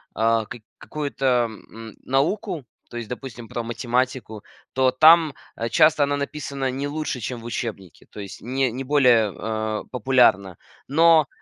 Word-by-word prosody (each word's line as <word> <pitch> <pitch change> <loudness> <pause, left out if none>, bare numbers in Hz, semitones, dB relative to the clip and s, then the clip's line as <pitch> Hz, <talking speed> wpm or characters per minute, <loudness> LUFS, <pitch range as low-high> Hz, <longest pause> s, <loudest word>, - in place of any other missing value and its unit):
а, 115 0 +1
как 110 +2 -10 0.2
какую-то, 145 -2 -5 0.2
м, 110 0 -12
науку, 160 - -1 0.2
то 120 - -8
есть, 120 -1 -6
допустим, 125 -2 -8
про 120 - -4
математику, 120 -1 -2 0.3
то 130 0 +3
там 155 +2 +6 0.4
часто 155 +3 +4
она 145 0 0
написана 140 -2 -4
не 140 +2 -3
лучше, 150 -3 -4
чем 120 +1 -5
в - - -13
учебнике, 110 -7 -6
то - - -11
есть 100 -1 -9
не 130 +1 -1
не 130 +3 -5
более, 125 -7 +3
э, 110 0 -3
популярна. 120 -8 +2 0.3
Но 160 0 +5
125 Hz, 145 wpm, -23 LUFS, 115-140 Hz, 0.4 s, там